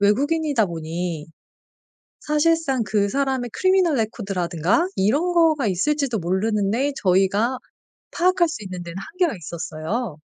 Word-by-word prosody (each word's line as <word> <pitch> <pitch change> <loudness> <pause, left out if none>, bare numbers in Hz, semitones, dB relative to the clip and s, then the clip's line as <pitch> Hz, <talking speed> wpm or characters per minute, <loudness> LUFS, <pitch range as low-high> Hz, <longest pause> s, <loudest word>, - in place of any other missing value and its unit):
외국인이다 280 +4 +2
보니 165 -1 -4 0.9
사실상 300 -4 +1
그 205 -1 +1
사람의 265 -2 -1
criminal 370 -3 +3
record라든가 200 - 0
이런 290 - +1
거가 320 -5 +3
있을지도 245 - 0
모르는데 210 +8 0
저희가 195 +6 +2 0.5
파악할 360 0 +3
수 310 -9 -6
있는 180 -2 -6
데는 170 +1 -8
한계가 345 - -1
있었어요. 170 - -4
225 Hz, 355 characters per minute, -22 LUFS, 185-300 Hz, 0.9 s, criminal